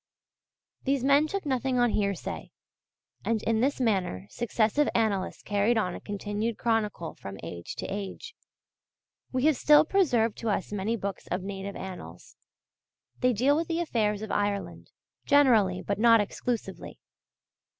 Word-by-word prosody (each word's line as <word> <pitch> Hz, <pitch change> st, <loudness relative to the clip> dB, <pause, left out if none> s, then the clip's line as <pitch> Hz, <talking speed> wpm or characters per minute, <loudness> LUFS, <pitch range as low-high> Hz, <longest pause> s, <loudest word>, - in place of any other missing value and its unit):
These 275 Hz, -2 st, 0 dB
men 285 Hz, +3 st, +4 dB
took 395 Hz, +2 st, -4 dB
nothing 260 Hz, -2 st, 0 dB
on 245 Hz, -1 st, +3 dB
hearsay: 200 Hz, -3 st, -2 dB, 0.7 s
and 225 Hz, -2 st, 0 dB
in 225 Hz, -1 st, +1 dB
this 275 Hz, +3 st, +1 dB
manner 190 Hz, -, 0 dB
successive 240 Hz, +4 st, +1 dB
annalists 215 Hz, -5 st, 0 dB
carried 205 Hz, +3 st, +1 dB
on 185 Hz, -5 st, 0 dB
a -, -, -7 dB
continued 205 Hz, +2 st, -3 dB
chronicle 215 Hz, -7 st, -1 dB
from 100 Hz, 0 st, -9 dB
age 85 Hz, +1 st, -7 dB
to -, -, -5 dB
age. 200 Hz, -, -6 dB, 1.0 s
We 255 Hz, +1 st, 0 dB
have 310 Hz, -4 st, +4 dB
still 300 Hz, +1 st, +6 dB
preserved 255 Hz, -, +2 dB
to 230 Hz, -, -2 dB
us 200 Hz, -1 st, -1 dB
many 205 Hz, +3 st, -1 dB
books 200 Hz, -3 st, -5 dB
of 180 Hz, +1 st, -2 dB
native 195 Hz, 0 st, -5 dB
Annals. 190 Hz, -1 st, -9 dB, 0.8 s
They 250 Hz, -, +3 dB
deal 255 Hz, +6 st, +3 dB
with 330 Hz, +2 st, -1 dB
the 330 Hz, 0 st, -1 dB
affairs 215 Hz, -10 st, 0 dB
of 215 Hz, -, -5 dB
Ireland 205 Hz, -1 st, -2 dB, 0.4 s
generally 225 Hz, -10 st, +4 dB
but 200 Hz, 0 st, -2 dB
not 230 Hz, 0 st, +6 dB
exclusively. 225 Hz, +3 st, -4 dB
225 Hz, 145 wpm, -28 LUFS, 200-260 Hz, 1.0 s, still